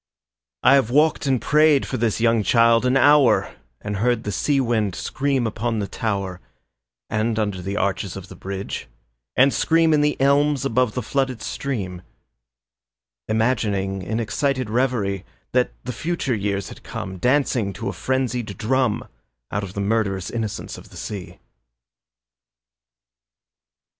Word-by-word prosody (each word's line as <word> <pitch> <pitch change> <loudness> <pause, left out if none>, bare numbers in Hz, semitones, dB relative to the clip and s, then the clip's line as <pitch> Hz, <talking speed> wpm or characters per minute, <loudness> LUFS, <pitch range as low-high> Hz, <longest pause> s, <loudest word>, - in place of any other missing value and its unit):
I 130 - +7
have 135 -5 +4
walked 150 +2 +3
and 130 -2 +2
prayed 150 0 +4
for - - -3
this 115 -1 0
young 115 -1 +3
child 115 +2 +4
an 130 +1 +3
hour 145 -2 +4 0.3
And 105 -1 -3
heard 120 +2 +1
the 105 - -3
sea 140 +6 +1
wind 110 -7 0
scream 135 -3 -1
upon 115 +1 -2
the 105 - -1
tower, 100 -3 -3 0.7
And 110 +1 0
under 100 -4 -1
the 100 +3 -3
arches 100 -1 -1
of 95 -1 -8
the - - -11
bridge, 95 0 -5 0.5
and 135 +2 +5
scream 165 -1 +3
In 150 - +4
the 150 0 +1
elms 140 0 +3
above 125 -3 +1
the 125 - -2
flooded 130 -1 -1
stream; 95 -10 -4 1.3
Imagining 105 -4 0
in 110 +5 -2
excited 130 +2 -1
reverie 110 -6 0 0.3
That 125 0 +2
the 125 - -4
future 165 -4 -2
years 100 -2 -2
had - - -11
come, 95 -1 -6
Dancing 125 -3 +1
to 110 +6 -5
a - - -2
frenzied 125 -6 -2
drum, 125 0 0 0.4
Out 105 - -1
of 100 0 -7
the 100 - -2
murderous 100 -3 0
innocence 110 -3 -4
of - - -15
the - - -13
sea. 100 -4 -6
115 Hz, 150 wpm, -22 LUFS, 100-130 Hz, 1.3 s, I